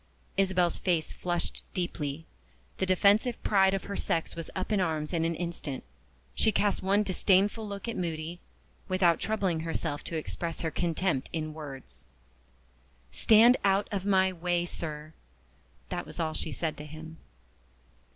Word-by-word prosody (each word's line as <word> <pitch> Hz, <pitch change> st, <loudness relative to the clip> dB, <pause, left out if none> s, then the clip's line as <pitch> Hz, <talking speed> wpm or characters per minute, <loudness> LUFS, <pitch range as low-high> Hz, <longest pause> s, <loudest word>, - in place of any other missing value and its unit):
Isabel's 185 Hz, -3 st, +2 dB
face 170 Hz, -4 st, +1 dB
flushed 175 Hz, -1 st, -2 dB
deeply; 160 Hz, -4 st, -3 dB, 0.5 s
the 190 Hz, -, +1 dB
defensive 205 Hz, +6 st, +4 dB
pride 195 Hz, -2 st, +4 dB
of 195 Hz, -, -3 dB
her 200 Hz, -, -5 dB
sex 165 Hz, -4 st, -1 dB
was 165 Hz, -1 st, -6 dB
up 190 Hz, +2 st, -3 dB
in 205 Hz, -2 st, +3 dB
arms 155 Hz, -2 st, -1 dB
in 165 Hz, -1 st, +1 dB
an 165 Hz, 0 st, 0 dB
instant. 165 Hz, -5 st, -4 dB, 0.5 s
She 220 Hz, -, +3 dB
cast 205 Hz, -1 st, +1 dB
one 200 Hz, +2 st, +3 dB
disdainful 200 Hz, +3 st, +2 dB
look 200 Hz, +2 st, -6 dB
at 230 Hz, -, -2 dB
Moody, 165 Hz, 0 st, -3 dB, 0.5 s
without 185 Hz, -3 st, +3 dB
troubling 195 Hz, -6 st, 0 dB
herself 160 Hz, -2 st, -2 dB
to 165 Hz, -, -3 dB
express 165 Hz, +1 st, -4 dB
her 160 Hz, -, -1 dB
contempt 170 Hz, -5 st, 0 dB
in 155 Hz, -1 st, -3 dB
words. 145 Hz, -4 st, -9 dB, 1.1 s
"Stand 230 Hz, +3 st, +6 dB
out 195 Hz, +1 st, +3 dB
of 200 Hz, -3 st, -1 dB
my 190 Hz, -1 st, +3 dB
way, 175 Hz, 0 st, 0 dB
sir!" 155 Hz, -2 st, -6 dB, 0.8 s
that 85 Hz, -, -3 dB
was -, -, -8 dB
all 160 Hz, -1 st, 0 dB
she 160 Hz, -, -3 dB
said 155 Hz, +4 st, -2 dB
to 150 Hz, -, -7 dB
him. 160 Hz, +1 st, -9 dB
175 Hz, 150 wpm, -29 LUFS, 160-195 Hz, 1.1 s, Stand